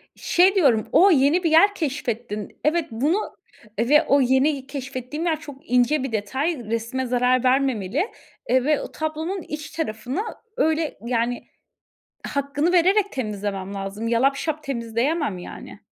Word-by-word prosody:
Şey 370 +3 +3
diyorum: 255 - +3
O, 390 +3 +6
yeni 300 +4 +3
bir 330 - +1
yer 400 +6 +6
keşfettin. 235 - -4
Evet, 325 +1 +2
bunu 295 - -1 0.4
ve 295 +8 +4
o 280 -2 +3
yeni 265 +2 +2
keşfettiğin 275 +2 -5
yer 320 -3 0
çok 285 -3 -12
ince 250 +3 +3
bir 270 - -3
detay. 265 +10 -1
Resme 230 +3 -2
zarar 250 0 +2
vermemeli, 260 - +1 0.4
eee, 255 0 +3
ve 300 +1 +2
o - - -7
tablonun 315 +5 -3
iç 305 0 -7
tarafını, 275 - -3 0.4
öyle, 315 0 0
yani, 240 0 -1 0.8
hakkını 285 +4 -1
vererek 380 +3 +3
temizlemem 205 -5 -4
lazım. 200 +3 -4
Yalapşap 275 +6 +1
temizleyemem, 240 - -1
yani. 175 - -10
275 Hz, 135 wpm, -23 LUFS, 235-315 Hz, 0.8 s, O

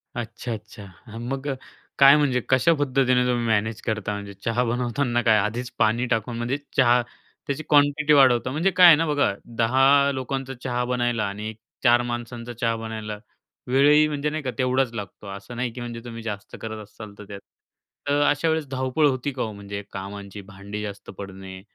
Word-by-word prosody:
अच्छा, 120 0 -5
अच्छा. 105 -1 -10 0.2
हं 115 0 -8
मग 135 +1 -4
अ, 135 - -1 0.4
काय 140 +1 +9
म्हणजे, 135 -4 +1
कशा 130 +6 +4
पद्धतीने 130 -3 +2
तुम्ही 120 -1 0
मॅनेज 110 0 0
करता? 110 -3 -2
म्हणजे 100 -1 -7
चहा 115 +2 +1
बनवताना 120 +1 0
काय 110 -3 +4
आधीच 115 +5 -2
पाणी 115 +2 +2
टाकून, 115 +1 -1
म्हणजे 120 +4 -1 0.2
चहा 125 -2 +5 0.5
त्याची 140 +2 -3
क्वांटिटी 145 +1 +4
वाढवता 130 -3 +5
म्हणजे 165 +8 +1
काय 180 -1 +9
आहे 165 - +10
ना 165 +2 0
बघा 145 -7 +2 0.2
10 135 +4 +4
लोकांचा 135 0 -4
चहा 125 -1 -1
बनायला 120 -2 0
आणि 105 +2 -5 0.3
4 120 0 +5
माणसांचा 120 0 -5
चहा 115 -1 -1
बनायला 110 -1 -6 0.5
वेळही 145 +4 +5
म्हणजे 150 0 -2
नाही 155 0 -4
का 130 - -2
तेवढाच 130 -1 +1
लागतो. 105 -1 -8
असं 100 +4 -8
नाही 120 0 -2
की 120 - -7
म्हणजे 120 -1 -6
तुम्ही 115 -1 -8
जास्त 105 -3 -6
करत 110 -1 -6
असाल 105 0 -12
तर 105 - -9
त्यात 100 0 -8 0.7
तर 145 +1 +2
अशा 145 +3 +1
वेळेस 160 -2 0
धावपळ 130 +3 +1
होती 135 +1 -1
का 130 - -5
हो? 110 - -4
म्हणजे 100 0 -7
कामांची 100 +1 -7
भांडी 100 +2 -8
जास्त 100 -1 -8
पडणे. 95 -1 -9
120 Hz, 180 wpm, -24 LUFS, 110-135 Hz, 0.7 s, आहे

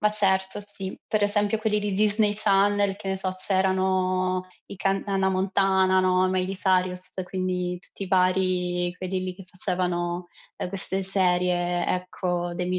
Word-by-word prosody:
Ma 210 - +3
certo, 190 -2 +1
sì. 195 -2 -7
Per 215 -1 0
esempio 205 +1 +1
quelli 215 -1 +1
di 205 -1 -2
Disney 210 +1 +2
Channel, 200 -1 +2
che 195 - -7
ne 190 - 0
so, 190 0 -2
c'erano 185 -1 +1 0.2
i - - -9
canta 195 +1 -1
Hannah 190 0 +2
Montana, 190 0 +3
no, 185 0 +3
Miley 185 +1 -1
Cyrus, 185 -1 0 0.2
quindi 180 -1 -2
tutti 195 - -8
i - - -9
vari 180 -1 +1
quelli 185 0 -2
lì 185 -1 -4
che 195 - -12
facevano, 180 -1 -1 0.3
ehm, - - -3
queste 195 0 -2
serie, 180 -2 +1
ecco. 180 -1 -2
Demi 180 +1 -1
185 Hz, 155 wpm, -25 LUFS, 180-195 Hz, 0.3 s, Ma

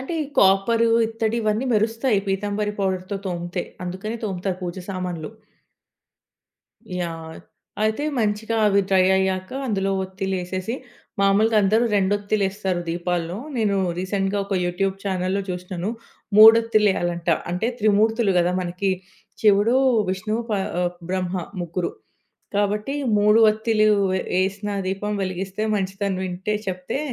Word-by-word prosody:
అంటే, 270 +6 -5
ఈ - - -3
కాపరు, 195 +4 +4 0.2
ఇత్తడి 225 0 -2
ఇవన్నీ 215 +4 0
మెరుస్తాయి 225 +1 +2
పీతాంబరి 205 +2 -1
పౌడర్‌తో 190 +1 -2
తోమితే. 175 0 -3 0.2
అందుకనే, 195 +6 -4
తోముతారు 185 -1 -3
పూజ 175 -1 -3 0.2
సామాన్లు. 180 -2 -4 1.7
యాహ్! 165 -2 -5 0.5
అయితే, 220 +7 0
మంచిగా 220 +1 0
అవి 200 -1 +4
డ్రై 185 -1 +5
అయ్యాక 190 -1 -1 0.2
అందులో 195 -3 0
ఒత్తిలేసేసి 190 +2 -3 0.5
మామూలుగా 210 +3 +3
అందరూ 220 +5 +3
రెండొత్తిలేస్తారు 200 -1 0
దీపాల్లో. 175 +1 -2 0.2
నేను 210 -3 +1 0.2
రీసెంట్‍గా 195 +1 -1
ఒక 200 - -2
యూట్యూబ్ 190 +2 0
ఛానెల్‍లో 190 +1 -1
చూశినాను. 180 +2 -4 0.5
మూడొత్తిలేయాలంట. 210 -6 +5 0.2
అంటే, 180 +6 -1
త్రిమూర్తులు 215 0 +3
గదా! 175 +1 +2
మనకి. 180 +2 -1 0.5
శివుడు, 210 +3 +4 0.3
విష్ణువు, 215 +5 -2
ప - - 0 0.3
ఆహ్ 175 0 0 0.2
బ్రహ్మ 185 -1 -1 0.3
ముగ్గురు. 175 +1 -2 0.7
కాబట్టి, 210 +5 0 0.2
3 210 +2 +5
ఒత్తిలు 215 0 +1 0.5
ఏసిన 195 +2 -2 0.2
దీపం 195 +2 -2
వెలిగిస్తే 190 +2 -3
మంచిదని 195 -1 -2
వింటే 185 +3 -3
చెప్తే 185 +7 -3
195 Hz, 115 wpm, -23 LUFS, 185-215 Hz, 1.7 s, డ్రై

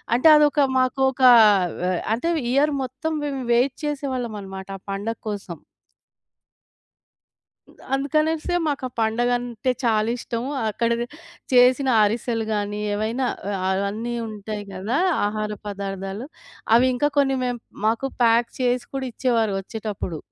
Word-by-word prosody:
అంటే 255 +6 +4
అదొక 295 0 +4 0.2
మాకోకా 260 0 +4 0.5
వ - - -3 0.3
అంటే, 290 +9 -2 0.2
ఇయర్ 290 +2 +3
మొత్తం 265 +6 -4
మేము 275 -2 -3
వెయిట్ 255 +3 +2
చేసేవాళ్ళమనమాట 235 -10 -4
ఆ - - -45
పండగ 210 +3 -3
కోసం. 195 -5 -6 2.4
అందుకనేసి 305 +5 0
మాకా 275 -3 -2
పండగంటే 240 +2 0
చాలా 220 -1 +2
ఇష్టము. 235 +3 -4 0.2
అక్కడనె 235 +2 -1 0.5
చేసిన 255 +2 +5
అరిసెలు 225 +1 -1
గాని, 205 0 -2
ఏవైనా 225 +5 -1 0.4
ఆహ్, 190 - +1
అ - - 0
అన్నీ 230 +4 -4
ఉంటాయి 210 -1 -6
గదా! 210 +9 -1 0.3
ఆహార 210 0 -2 0.2
పదార్థాలు. 195 +3 -5 0.5
అవి 250 +2 +5
ఇంకా 290 +4 +1
కొన్ని 270 -1 +2
మేము 245 -2 -3 0.3
మాకు 230 +5 0 0.2
ప్యాక్ 235 +1 +4
చేసి 245 -1 +1
కూడా 270 - -2
ఇచ్చేవారు 230 -5 +1
ఒచ్చేటప్పుడు. 205 -5 -5
240 Hz, 120 wpm, -23 LUFS, 215-265 Hz, 2.4 s, చేసిన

